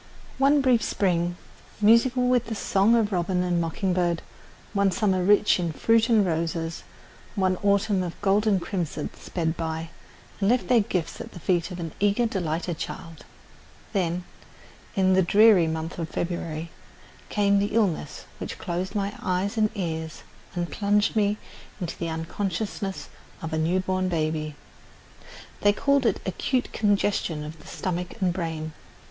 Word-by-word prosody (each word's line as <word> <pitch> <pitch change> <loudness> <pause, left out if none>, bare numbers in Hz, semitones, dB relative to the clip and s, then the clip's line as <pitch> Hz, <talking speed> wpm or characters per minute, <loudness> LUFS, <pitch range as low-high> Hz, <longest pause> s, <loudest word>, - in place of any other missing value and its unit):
One 280 +1 +5
brief 250 -4 +4
spring, 175 -4 0 0.4
musical 235 +4 +4
with 250 -2 +2
the 225 - -3
song 200 +2 +3
of 220 -2 +2
robin 180 0 0
and 175 -1 +1
mocking 180 +3 -1
bird, 175 -2 0 0.5
one 200 -1 +3
summer 190 -3 +1
rich 205 +1 +4
in 170 -2 -1
fruit 225 +8 +3
and 220 -4 +5
roses, 165 -1 -2 0.5
one 190 -2 +2
autumn 200 0 +2
of 175 -2 -5
gold 205 +2 +2
and 200 -3 +4
crimson 170 -5 -3
sped 165 -2 -3
by 160 0 -4 0.5
and 195 0 +2
left 250 +1 +1
their 245 -2 +6
gifts 180 -5 -2
at - - -9
the - - -9
feet 175 +1 +1
of 180 -1 -7
an 165 -2 -4
eager, 205 +4 +3
delighted 175 -5 -2
child. 165 -2 -7 0.7
Then, 180 -3 0 0.7
in 190 -2 +3
the 190 - +5
dreary 200 -1 +6
month 160 +2 -4
of 165 -1 -3
February, 170 -2 -3 0.6
came 200 -1 +3
the 205 +2 -1
illness 180 -9 0
which - - -5
closed 180 +4 -3
my 200 0 -1
eyes 185 +4 -1
and 215 -1 +3
ears 160 -4 -4 0.3
and 175 -1 -2
plunged 205 +1 +1
me 210 -1 +2 0.4
into 175 -4 -4
the 170 - -3
unconsciousness 195 +4 -3 0.4
of 160 0 -4
a - - 0
new 170 +4 +2
born 185 0 0
baby. 155 -2 -1 1.1
They 205 0 +5
called 280 +3 +2
it - - +1
acute 250 +7 -1
congestion 200 -6 +1
of 155 +1 -8
the - - -15
stomach 180 +2 -4
and 185 -3 +1
brain. 160 -3 -4
185 Hz, 155 wpm, -26 LUFS, 170-205 Hz, 1.1 s, their